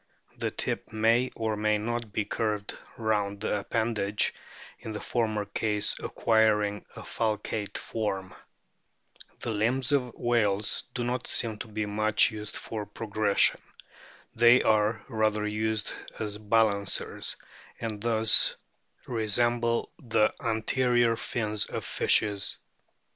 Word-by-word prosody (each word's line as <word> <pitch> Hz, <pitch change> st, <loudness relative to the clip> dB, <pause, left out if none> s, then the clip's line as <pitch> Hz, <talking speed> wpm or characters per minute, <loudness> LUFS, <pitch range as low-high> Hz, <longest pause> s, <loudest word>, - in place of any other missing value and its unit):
The -, -, 0 dB
tip -, -, -4 dB
may 115 Hz, +3 st, +2 dB
or 110 Hz, -1 st, -1 dB
may 105 Hz, 0 st, +1 dB
not 115 Hz, +1 st, -3 dB
be 105 Hz, 0 st, -1 dB
curved 105 Hz, -2 st, -2 dB, 0.2 s
round 105 Hz, -3 st, -1 dB
the 105 Hz, -1 st, 0 dB
appendage, 105 Hz, -1 st, 0 dB, 0.5 s
in 110 Hz, -, -7 dB
the 105 Hz, -, -4 dB
former 110 Hz, -3 st, -1 dB
case 105 Hz, 0 st, +1 dB
acquiring 105 Hz, -2 st, +1 dB
a -, -, -8 dB
falcate 105 Hz, -1 st, -2 dB
form. 95 Hz, -4 st, -3 dB, 1.1 s
The 120 Hz, -, -2 dB
limbs 120 Hz, +5 st, +1 dB
of 125 Hz, -4 st, 0 dB
whales 110 Hz, -4 st, +1 dB
do 120 Hz, -, -1 dB
not 125 Hz, +1 st, -2 dB
seem 110 Hz, -3 st, 0 dB
to -, -, -6 dB
be 110 Hz, 0 st, -3 dB
much 110 Hz, +3 st, +3 dB
used 105 Hz, -1 st, -5 dB
for 105 Hz, -2 st, -5 dB
progression. 105 Hz, -1 st, +1 dB, 0.7 s
They 120 Hz, +2 st, +6 dB
are 110 Hz, 0 st, +2 dB
rather 110 Hz, -3 st, 0 dB
used 105 Hz, 0 st, -1 dB, 0.2 s
as 105 Hz, -1 st, -4 dB
balancers, 105 Hz, -2 st, +1 dB, 0.4 s
and 110 Hz, -2 st, -4 dB
thus 115 Hz, -1 st, +5 dB, 0.5 s
resemble 115 Hz, +1 st, 0 dB
the 115 Hz, -6 st, +2 dB
anterior 120 Hz, +1 st, +2 dB
fins 110 Hz, -2 st, -1 dB
of -, -, -5 dB
fishes. 100 Hz, -2 st, +1 dB
110 Hz, 120 wpm, -28 LUFS, 105-115 Hz, 1.1 s, They